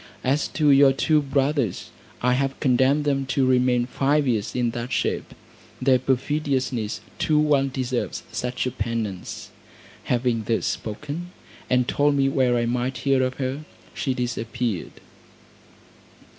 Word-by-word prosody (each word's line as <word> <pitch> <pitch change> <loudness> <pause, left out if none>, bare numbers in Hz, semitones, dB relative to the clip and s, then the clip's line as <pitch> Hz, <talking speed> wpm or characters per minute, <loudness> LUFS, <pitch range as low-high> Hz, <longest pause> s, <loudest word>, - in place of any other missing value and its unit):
As 140 +4 +1
to 150 -2 +4
your 135 -1 +6
two 150 +3 +2
brothers, 140 - -1 0.3
I 125 0 +3
have 135 +1 -1
condemned 135 +2 +3
them 135 -2 0
to 130 0 +1
remain 125 -1 +3
five 140 +3 +1
years 110 -5 -1
in 120 -2 +1
that 120 +2 -5
shape. - - -1 0.4
Their 130 -1 +4
perfidiousness 130 -4 -1 0.2
too 155 - +2
well 145 -3 +3
deserves 130 -2 -3
such 125 +1 -2
a 125 - -1
penance." 105 -5 -4 0.5
Having 120 -3 0
thus 115 +1 0
spoken 145 +10 -4 0.4
and 125 -1 +2
told 145 0 +2
me 135 -1 +3
where 130 -3 +2
I 120 - +1
might 125 +2 -1
hear 135 -1 +3
of 130 0 -1
her, 135 +2 -3 0.3
she 130 -2 -2
disappeared. 120 -4 -3
130 Hz, 140 wpm, -24 LUFS, 120-140 Hz, 0.5 s, your